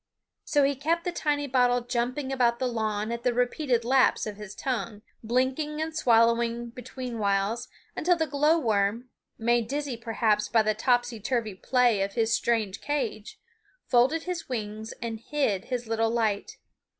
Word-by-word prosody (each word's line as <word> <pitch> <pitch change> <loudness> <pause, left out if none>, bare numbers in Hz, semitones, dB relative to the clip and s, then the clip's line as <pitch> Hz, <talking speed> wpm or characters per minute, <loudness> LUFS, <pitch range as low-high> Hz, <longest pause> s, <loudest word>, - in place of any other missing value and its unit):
So 290 -3 +3
he 275 +1 +3
kept 325 +5 0
the 355 - -1
tiny 295 -4 -1
bottle 245 -2 +2
jumping 250 +3 -2
about 240 -3 +2
the 260 - -1
lawn 215 -2 -2
at 235 0 -3
the 245 -1 0
repeated 245 -1 0
laps 260 +1 +3
of 210 -1 -5
his 210 -1 -9
tongue, 230 -5 -3 0.2
blinking 260 +6 0
and 315 0 -3
swallowing 235 -3 +2
betweenwhiles 230 -4 -2 0.3
until 355 +3 +2
the 325 -1 0
glow 300 +3 +3
worm, 225 -2 0 0.3
made 235 0 +1
dizzy 285 -3 -3
perhaps 220 -2 0
by 225 -2 +4
the 215 0 +1
topsy 245 +1 +1
turvy 220 -1 -1
play 240 +1 +2
of 195 0 -1
his 230 -1 +1
strange 220 -6 0
cage, 250 -8 -3 0.5
folded 265 +7 +3
his 360 -4 -5
wings 220 -2 -4
and 225 -1 -4
hid 230 -7 -1
his 245 -2 -3
little 225 0 0
light. 220 -3 -1
240 Hz, 160 wpm, -27 LUFS, 220-265 Hz, 0.5 s, by